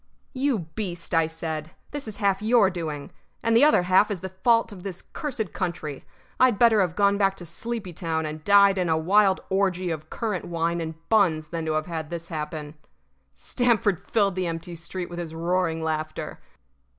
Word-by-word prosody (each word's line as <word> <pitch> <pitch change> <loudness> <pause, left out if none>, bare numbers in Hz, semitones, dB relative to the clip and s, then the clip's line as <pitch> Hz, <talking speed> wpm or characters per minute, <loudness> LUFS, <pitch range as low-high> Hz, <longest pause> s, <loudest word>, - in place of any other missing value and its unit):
"You 270 -2 +1 0.2
beast," 180 -5 -5
I 165 -1 +4
said, 160 -1 -5 0.2
"this 290 -4 -5
is 215 - -6
half 200 -2 +1
your 215 -3 +4
doing. 155 -5 -5 0.3
And 230 0 +2
the 235 - +6
other 300 -11 +5
half 185 +4 +4
is 200 -4 -3
the 190 - -5
fault 230 -1 +4
of 195 -3 -10
this 185 -2 -7
cursed 245 - -4
country. 170 -6 -4 0.4
I'd 255 -5 +5
better 225 -2 +5
have 180 -3 0
gone 200 0 +3
back 195 -1 +2
to 175 - -8
Sleepy 205 +2 -5
town 160 -1 -2
and 155 0 -6
died 200 0 +6
in 180 -2 0
a 160 - +3
wild 190 +4 +3
orgy 185 -2 +1
of 155 -1 -5
currant 215 -6 -3
wine 170 0 -1
and 160 -1 -4
buns 165 -8 +3
than 165 -1 -4
to 155 - +1
have 155 0 0
had 160 -3 -5
this 170 -1 -6
happen." 150 -1 -5 0.6
Stamford 215 - +1
filled 200 -4 +3
the 185 -1 -1
empty 165 +1 -5
street 170 +2 -6
with 175 0 -7
his 165 -2 -6
roaring 165 -1 0
laughter. 155 -1 -3
180 Hz, 190 wpm, -25 LUFS, 160-205 Hz, 0.6 s, the